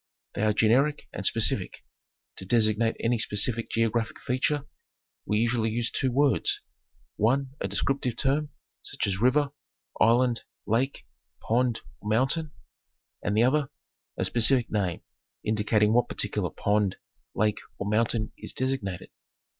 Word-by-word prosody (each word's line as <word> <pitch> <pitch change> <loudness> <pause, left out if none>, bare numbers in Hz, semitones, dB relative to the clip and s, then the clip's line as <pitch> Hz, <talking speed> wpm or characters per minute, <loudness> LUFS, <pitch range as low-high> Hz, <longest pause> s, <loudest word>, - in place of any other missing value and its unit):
They - - -3
are 110 0 +3
generic 125 +8 +2
and - - -5
specific. - - +1 0.5
To - - -7
designate 115 0 +2
any 115 0 +1
specific 115 0 0
geo 115 -1 +1
graphic 115 -1 -2
feature 135 +3 -1 0.6
we 105 - +1
usually 115 0 +1
use 115 +1 -1
two 130 - 0
words, 140 +2 +2 0.5
one 130 +5 +1
a - - 0
descriptive 135 -3 -1
term, 145 +2 +1 0.3
such - - -3
as 100 0 -2
river, 140 +3 +3 0.5
island, 120 +1 +3 0.2
lake, 125 +6 -1 0.3
pond 120 0 0 0.2
or 105 - -6
mountain, 135 +8 +1 0.7
and 100 +2 -1
the 115 - +5
other, 140 +3 +2 0.5
a - - 0
specific 120 +1 +2
name 95 -5 -1 0.4
indicating 105 0 +2
what 120 0 +3
particular - - -1
pond, 100 -2 0 0.4
lake, 105 0 +1 0.2
or 100 - -4
mountain 110 +1 +1
is - - -6
designated. 130 -9 -3
115 Hz, 135 wpm, -27 LUFS, 110-130 Hz, 0.7 s, the